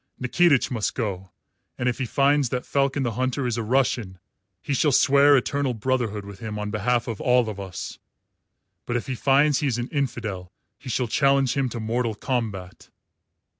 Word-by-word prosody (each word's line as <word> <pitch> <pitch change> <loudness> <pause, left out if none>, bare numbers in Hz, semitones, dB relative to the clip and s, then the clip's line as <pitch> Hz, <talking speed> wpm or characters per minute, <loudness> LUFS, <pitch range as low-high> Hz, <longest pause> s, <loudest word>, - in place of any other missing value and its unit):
Nikitich 140 +2 +3
must 115 -4 -2
go, 95 -6 -3 0.5
and 125 - -1
if 125 - -1
he 130 - -2
finds 140 +1 +2
that 125 +1 -3
Falcon 140 0 0
the 120 - -1
Hunter 130 +3 -1
is 120 -2 -1
a 115 - -2
Russian 115 -5 0 0.4
he 140 - -3
shall 145 +2 +2
swear 140 +2 +5
eternal 135 0 -1
brotherhood 110 -3 -1
with 100 -1 -10
him 110 -2 -5
on 105 0 -4
behalf 120 +3 0
of 115 -4 -5
all 125 -2 +3
of 105 -2 -5
us. 95 -3 -7 0.9
But 120 - -2
if 120 - -1
he 130 - -3
finds 140 +3 +3
he 145 - 0
is 120 -3 0
an 120 +1 -4
infidel 115 - -3 0.3
he 135 - -9
shall 125 +1 0
challenge 135 +1 +2
him 135 -2 0
to 120 - -6
mortal 115 0 -1
combat." 105 -7 -4
125 Hz, 185 wpm, -24 LUFS, 110-135 Hz, 0.9 s, swear